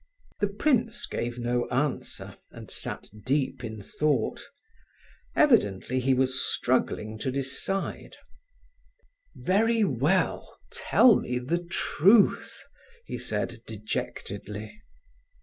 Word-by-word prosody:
The 205 - +2
prince 230 +2 +1
gave 120 0 -3
no 120 0 0
answer, 135 +3 -2
and - - -11
sat - - -4 0.2
deep 135 -1 0
in 110 -3 -6
thought. 145 0 0 0.9
Evidently 130 - +3
he 130 +1 +2
was 130 0 +1
struggling 110 -3 0
to 130 - -2
decide. 140 +9 -2 1.2
"Very 225 +4 +2
well! 165 - 0
Tell 245 -3 +5
me 125 - -2
the 165 +8 -1
truth," 195 +4 +3 0.4
he - - -5
said, 115 - -3
dejectedly. 105 - -5
130 Hz, 95 wpm, -27 LUFS, 120-195 Hz, 1.2 s, Tell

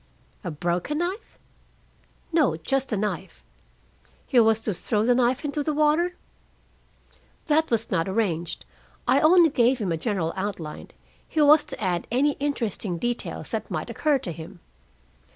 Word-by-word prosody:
"A 180 - -3
broken 175 - -2
knife?" 360 +6 -4 1.0
"No. 290 - +3
Just 270 +12 -1
a 215 - 0
knife." 195 -2 -4 0.8
"He 255 - +3
was 225 -1 +4
to 215 -2 -2
throw 210 +4 0
the 245 - +4
knife 250 +3 +1
into 295 +1 -2
the 300 +1 -1
water?" 310 +4 +2 1.3
"That 315 0 +2
was 230 -1 0
not 185 -1 0
arranged. 185 -5 -2 0.4
I 260 +3 +5
only 330 +1 +6
gave 250 -1 +3
him 205 -7 -2
a 165 - 0
general 170 -3 -1
outline. 190 -6 -5 0.4
He 315 - -2
was 300 0 +7
to - - -8
add 180 -4 -1
any 270 +5 +2
interesting 230 -10 -2
details 240 +6 -3
that - - -3
might - - -4
occur 300 -3 +2
to 185 - -6
him. 170 +3 -10
235 Hz, 150 wpm, -25 LUFS, 185-295 Hz, 1.3 s, was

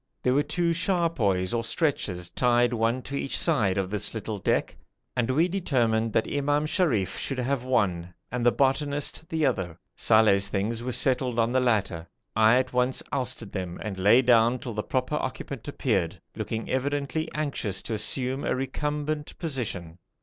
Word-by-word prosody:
There 125 - +3
were 140 - +4
two 170 +3 0
charpoys 165 - +1
or 115 -1 0
stretchers 105 - -1
tied 120 0 +3
one 115 +2 0
to 140 - -6
each 140 - -1
side 105 - +2
of 95 -1 -1
this 105 +2 -1
little 110 -1 -4
deck, - - 0 0.4
and 125 -1 0
we 155 +7 +3
determined 120 - +1
that 115 - +2
Imam 145 +1 0
Sharif 150 - 0
should 135 - -2
have 130 0 -1
one, 90 -9 0 0.2
and 125 0 -2
the 120 - +5
'botanist' 145 +4 0
the 160 -2 +1
other. 95 -10 -1 0.2
Saleh's 105 -3 +4
things 105 +3 -2
were 125 +1 -3
settled 125 -1 +1
on 115 0 +2
the 130 - +3
latter. 100 -9 0 0.3
I 110 +2 +5
at 130 0 -1
once 125 +1 +1
ousted 125 -5 -2
them 90 -3 -5
and 100 -3 -5
lay 105 +7 +5
down 120 0 +4
till 120 -1 -6
the 105 - -2
proper 130 +6 -1
occupant 130 -1 -5
appeared, 105 - -1 0.2
looking 110 0 -4
evidently 140 +3 -1
anxious 140 -10 -2
to 115 - -4
assume 130 +5 +1
a - - 0
recumbent 150 +3 -3
position. 100 - -4
125 Hz, 170 wpm, -26 LUFS, 110-140 Hz, 0.4 s, the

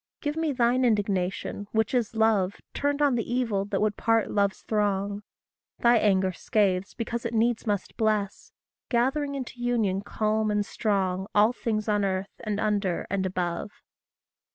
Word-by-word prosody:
Give 295 0 -2
me 320 -1 0
thine 250 0 +2
indignation 205 -3 0
which 220 +1 +1
is 235 -3 0
love 215 -4 +2
Turned 285 +1 0
on 285 -2 +4
the 235 -1 -2
evil 225 -6 0
that 200 -1 -2
would 210 -1 +1
part 225 -1 +2
love's 200 -1 0
throng; 205 -1 0 0.6
Thy 235 0 +5
anger 190 -3 +2
scathes 195 0 0
because 235 0 -3
it 235 0 -3
needs 235 +1 +1
must 205 -2 -2
bless, 215 -3 -1 0.4
Gathering 275 +4 +1
into 250 -2 -6
union 220 -6 +1
calm 215 +1 0
and 210 -1 +1
strong 190 -3 -1
All 215 +3 +5
things 215 -3 -2
on 210 -1 +2
earth, 190 0 -2
and 210 -2 -3
under, 205 -5 0
and 190 -1 0
above. 180 0 -2
215 Hz, 155 wpm, -27 LUFS, 200-235 Hz, 0.6 s, Thy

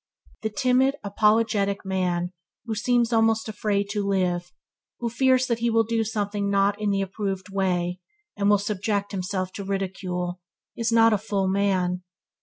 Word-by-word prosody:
The 220 - -1
timid, 255 +5 +2
apologetic 205 -1 +2
man 180 -2 -1 0.3
who 225 - -2
seems 240 +2 +1
almost 225 0 +3
afraid 205 -2 -1
to 205 -1 -1
live, 180 -3 0 0.5
who 235 -1 -3
fears 260 +1 +3
that 235 -2 -1
he 235 0 +1
will 225 0 +3
do 225 0 0
something 205 -2 -2
not 200 +1 +2
in 210 - +1
the 195 -1 +1
approved 195 -1 -4
way, 180 -2 -1 0.4
and 200 0 +1
will 205 - +6
subject 205 0 -2
himself 185 -1 -3
to 200 - -5
ridicule, 185 -2 -3 0.3
is 230 0 -1
not 225 -1 +5
a 210 - +1
full 200 -2 -1
man. 190 -2 +1
200 Hz, 160 wpm, -25 LUFS, 190-225 Hz, 0.5 s, will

